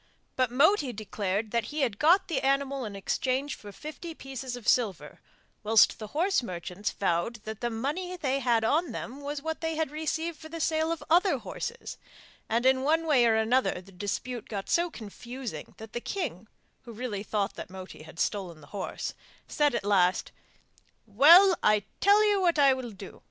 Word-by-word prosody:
But 255 Hz, -2 st, +2 dB
Moti 285 Hz, -, +3 dB
declared 210 Hz, -1 st, -3 dB
that 235 Hz, -1 st, 0 dB
he 300 Hz, +6 st, -4 dB
had 230 Hz, -7 st, 0 dB
got 345 Hz, +6 st, +5 dB
the 325 Hz, -, -1 dB
animal 275 Hz, -1 st, 0 dB
in 205 Hz, -2 st, -6 dB
exchange 260 Hz, +7 st, -1 dB
for 205 Hz, -, -10 dB
fifty 310 Hz, -, -8 dB
pieces 265 Hz, -3 st, -6 dB
of 245 Hz, -3 st, -10 dB
silver, 190 Hz, -12 st, +1 dB, 0.4 s
whilst 215 Hz, 0 st, +4 dB
the 215 Hz, -, -6 dB
horse 345 Hz, -, +1 dB
merchants 180 Hz, -1 st, -4 dB
vowed 185 Hz, +4 st, -1 dB
that 220 Hz, -1 st, -7 dB
the 240 Hz, -, 0 dB
money 300 Hz, +11 st, -3 dB
they 275 Hz, -4 st, 0 dB
had 235 Hz, -3 st, +2 dB
on 300 Hz, +4 st, +1 dB
them 260 Hz, +6 st, -6 dB
was 285 Hz, 0 st, -5 dB
what 320 Hz, 0 st, -4 dB
they 325 Hz, -1 st, -1 dB
had 315 Hz, -3 st, -1 dB
received 315 Hz, +1 st, -3 dB
for 315 Hz, -, -10 dB
the 330 Hz, +1 st, -6 dB
sale 320 Hz, 0 st, +1 dB
of 330 Hz, -, -3 dB
other 355 Hz, +4 st, +4 dB
horses; 475 Hz, 0 st, -6 dB, 0.5 s
and 235 Hz, +3 st, +1 dB
in 260 Hz, 0 st, +4 dB
one 320 Hz, +4 st, +2 dB
way 275 Hz, -6 st, +4 dB
and 225 Hz, -1 st, +4 dB
another 225 Hz, -2 st, +2 dB
the 190 Hz, +2 st, -15 dB
dispute 210 Hz, +5 st, -4 dB
got 200 Hz, -3 st, -5 dB
so 345 Hz, +1 st, +2 dB
confusing 235 Hz, -, -8 dB
that 220 Hz, 0 st, -11 dB
the 240 Hz, -, -3 dB
king 240 Hz, -, -4 dB, 0.3 s
(who 235 Hz, -, -11 dB
really 220 Hz, -3 st, -4 dB
thought 205 Hz, -1 st, -1 dB
that -, -, -8 dB
Moti 185 Hz, -2 st, -10 dB
had 160 Hz, +2 st, -12 dB
stolen 185 Hz, -6 st, -2 dB
the 145 Hz, -, -15 dB
horse) 200 Hz, -, -4 dB, 0.3 s
said 295 Hz, -4 st, +1 dB
at 220 Hz, -, -2 dB
last, 185 Hz, -3 st, +2 dB, 0.7 s
'Well, 330 Hz, -, +7 dB
I 210 Hz, -1 st, +3 dB, 0.2 s
tell 410 Hz, +2 st, +5 dB
you 405 Hz, -2 st, +2 dB
what 345 Hz, -3 st, +2 dB
I 280 Hz, -2 st, +6 dB
will 260 Hz, -2 st, -5 dB
do. 195 Hz, -3 st, -11 dB
250 Hz, 190 wpm, -28 LUFS, 210-310 Hz, 0.7 s, Well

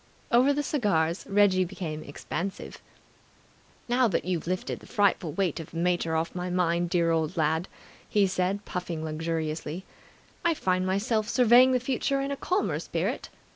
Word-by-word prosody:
Over 255 Hz, +4 st, +5 dB
the 290 Hz, +1 st, 0 dB
cigars 195 Hz, -, 0 dB
Reggie 195 Hz, -2 st, +4 dB
became 170 Hz, -4 st, -5 dB
expansive. 175 Hz, +6 st, -6 dB, 1.1 s
"Now 245 Hz, +1 st, +3 dB
that 180 Hz, -6 st, -1 dB
you've 175 Hz, -3 st, -2 dB
lifted 185 Hz, +1 st, -2 dB
the -, -, -15 dB
frightful 190 Hz, -6 st, +1 dB
weight 185 Hz, -4 st, 0 dB
of 160 Hz, -, -8 dB
the 165 Hz, -, -8 dB
mater 175 Hz, -1 st, +1 dB
off 160 Hz, +1 st, -1 dB
my 180 Hz, 0 st, -3 dB
mind, 175 Hz, -1 st, +1 dB
dear 170 Hz, -2 st, +2 dB
old 160 Hz, +1 st, 0 dB
lad," 160 Hz, +2 st, +1 dB, 0.4 s
he 205 Hz, -2 st, +3 dB
said, 190 Hz, +2 st, -1 dB
puffing 175 Hz, -3 st, -4 dB
luxuriously, 160 Hz, +1 st, -3 dB, 0.6 s
"I 340 Hz, -1 st, +2 dB
find 185 Hz, -6 st, 0 dB
myself 210 Hz, +3 st, 0 dB
surveying 250 Hz, +1 st, +6 dB
the 255 Hz, -, +3 dB
future 270 Hz, +2 st, -1 dB
in 275 Hz, +1 st, -2 dB
a -, -, -1 dB
calmer 370 Hz, +8 st, -1 dB
spirit. -, -, -3 dB
185 Hz, 160 wpm, -27 LUFS, 165-215 Hz, 1.1 s, surveying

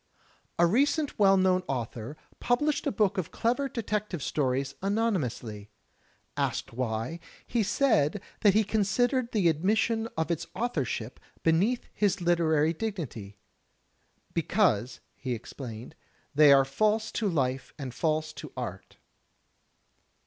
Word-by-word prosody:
A 170 Hz, -, +5 dB
recent 280 Hz, -, +1 dB
well 195 Hz, -1 st, +6 dB
known 185 Hz, -1 st, +3 dB
author 120 Hz, +2 st, -4 dB, 0.2 s
published 295 Hz, +5 st, +1 dB
a -, -, +2 dB
book 205 Hz, -4 st, +1 dB
of 180 Hz, -1 st, -3 dB
clever 250 Hz, +8 st, 0 dB
detective 210 Hz, -, -3 dB
stories 135 Hz, -2 st, 0 dB
anonymously. 150 Hz, -, -1 dB, 0.7 s
Asked -, -, -2 dB
why, 115 Hz, +6 st, -2 dB, 0.3 s
he 235 Hz, -, 0 dB
said 205 Hz, -, +2 dB, 0.2 s
that 205 Hz, -2 st, +4 dB
he 220 Hz, -, +5 dB
considered 235 Hz, +5 st, +1 dB
the 200 Hz, -6 st, +2 dB
admission 215 Hz, +7 st, +1 dB
of 160 Hz, +1 st, 0 dB
its 165 Hz, 0 st, -2 dB
authorship 135 Hz, -, -2 dB, 0.2 s
beneath 190 Hz, +10 st, +2 dB
his 205 Hz, -3 st, +1 dB
literary 165 Hz, -3 st, +2 dB
dignity. 155 Hz, -, -5 dB, 1.0 s
"Because," 155 Hz, -, +1 dB
he 130 Hz, -3 st, -3 dB
explained, 120 Hz, +1 st, -8 dB, 0.4 s
"they 150 Hz, 0 st, +7 dB
are 135 Hz, -1 st, +6 dB
false 215 Hz, +10 st, +1 dB
to 215 Hz, -3 st, 0 dB
life 135 Hz, -5 st, -1 dB
and 135 Hz, -5 st, -6 dB
false 155 Hz, +2 st, -1 dB
to -, -, -9 dB
art." -, -, -6 dB
175 Hz, 120 wpm, -28 LUFS, 135-215 Hz, 1.0 s, they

